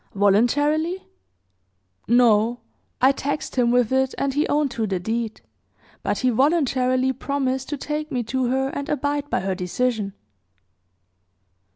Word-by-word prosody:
"Voluntarily?" 290 - +2 1.0
"No; 235 0 +3 0.4
I 265 - +7
taxed 285 +2 -4
him 245 -2 +3
with 245 -1 +2
it, 265 0 +1
and 275 -1 -1
he 295 +3 +1
owned 290 -2 +1
to 225 -2 -2
the 190 -2 -1
deed; 225 +3 -3 0.6
but - - -1
he 255 -1 +1
voluntarily 260 -1 +2
promised 265 0 -2
to 295 - -3
take 300 +2 -4
me 250 -3 -1
to 255 +3 -1
her 265 +2 0
and 280 0 -5
abide 290 0 -1
by - - 0
her 190 0 -1
decision." 200 +3 -2
255 Hz, 140 wpm, -23 LUFS, 235-285 Hz, 1.0 s, I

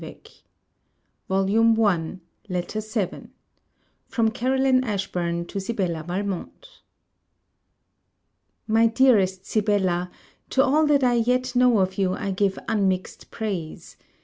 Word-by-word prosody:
SIBELLA - - -9 1.1
VALMONT 195 -3 +2 0.3
LETTER 180 +4 -3
VII 215 -3 -4 0.8
FROM 225 -2 +1
CAROLINE 260 +2 +2
ASHBURN 180 -6 -2
TO 200 - -5
SIBELLA 190 -5 -2
VALMONT 200 - -5 1.8
My 225 +1 +4
dearest 215 -6 +2
Sibella, 190 -5 0 0.4
To 265 - +3
all 300 +3 +3
that 285 -2 +3
I 245 -1 +3
yet 250 +2 0
know 250 -2 +4
of 190 0 0
you, 185 -1 +1
I 200 - -3
give 195 0 0
unmixed 190 -3 -1
praise. 190 -8 -5
205 Hz, 105 wpm, -24 LUFS, 185-235 Hz, 1.8 s, My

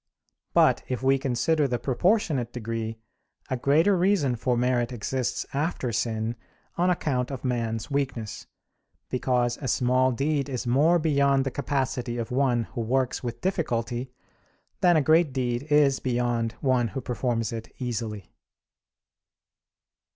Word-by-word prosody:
But - - +5
if 125 0 -3
we 135 0 +3
consider 140 +4 +1
the 125 -2 -1
proportionate 145 - +1
degree, 115 -1 -4 0.5
a - - +2
greater 155 +10 +3
reason 175 -8 +2
for 120 +1 0
merit 125 0 +1
exists 125 +1 -2
after 140 -3 -1
sin, 115 0 -1 0.4
on 175 +2 +2
account 135 -8 0
of 135 -3 -6
man's 115 0 -2
weakness; 130 -6 -3 0.6
because 125 -1 0
a 135 - -3
small 130 0 +2
deed 140 +3 -1
is 125 -2 -3
more 145 +8 +4
beyond 140 -4 +2
the 135 - -1
capacity 130 -4 -2
of 115 0 -4
one 125 -2 +2
who 120 - -2
works 130 +3 0
with 120 -1 -5
difficulty 125 -9 -2 0.7
than 175 -2 +5
a 155 - +3
great 160 -1 +4
deed 125 +1 -2
is 145 -2 +4
beyond 120 -2 0
one 130 -3 +2
who 135 - -5
performs 120 -2 -2
it 115 -1 -6
easily. 110 -5 -4
125 Hz, 135 wpm, -26 LUFS, 120-140 Hz, 0.7 s, But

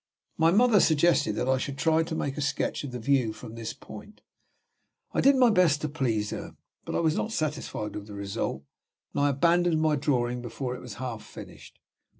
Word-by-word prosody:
My 160 +1 +4
mother 215 +3 +5
suggested 160 - +3
that 115 - -2
I 130 0 +2
should 140 +1 -4
try 160 +3 +3
to 160 0 -3
make 140 -3 -2
a 150 - -4
sketch 145 +1 -1
of 145 - -5
the 125 - -4
view 125 -2 +1
from 110 - -10
this 115 -1 -5
point. 115 - -12 0.9
I - - +2
did 275 +1 +6
my 250 -3 +5
best 175 -7 +4
to 155 - -2
please 115 -8 -1
her, - - -6 0.3
but - - -4
I - - +2
was 160 -1 +2
not 220 - -2
satisfied 150 - -3
with 105 0 -7
the 105 - -9
result; 100 - -3 0.5
and - - 0
I 145 - +4
abandoned 170 +4 +2
my 155 -1 +2
drawing 125 -4 0
before 125 +2 -4
it - - -9
was 125 - -8
half 120 -4 -5
finished. - - -12
140 Hz, 205 wpm, -27 LUFS, 120-160 Hz, 0.9 s, did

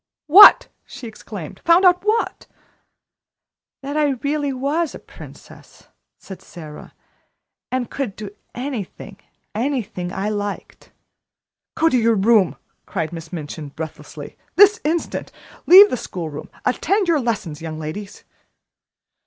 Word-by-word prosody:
"What!" 385 +8 +9 0.2
she 255 - -10
exclaimed, 205 -7 -10
"found 340 +3 +4
out 360 0 +4
what?" 435 +2 -1 1.4
"That 280 +2 -5
I 295 -2 +2
really 290 0 -1
was 285 +5 -2
a - - -6
princess," - - -15 0.3
said 190 - -11
Sara, 155 -3 -12 0.8
"and 255 -2 -2
could 250 -8 -4
do 210 -2 -8 0.2
anything 235 -6 -6 0.4
anything 220 -7 -3
I 195 +2 -3
liked." 205 -1 -6 0.8
"Go 325 - +2
to 260 - +2
your 230 0 +2
room," 205 -2 +3 0.3
cried 170 -3 -4
Miss 165 -1 -9
Minchin 155 -3 -7
breathlessly, 160 +2 -9 0.2
"this 410 +2 +6
instant. 325 +2 -2 0.4
Leave 395 +4 +9
the - - -1
school 175 -7 -6
room. 145 - -9 0.2
Attend 385 +10 +1
to 340 - +1
your 315 - +2
lessons, 195 -10 -3
young 160 -1 -6
ladies." 190 +7 -7
230 Hz, 130 wpm, -20 LUFS, 180-300 Hz, 1.4 s, What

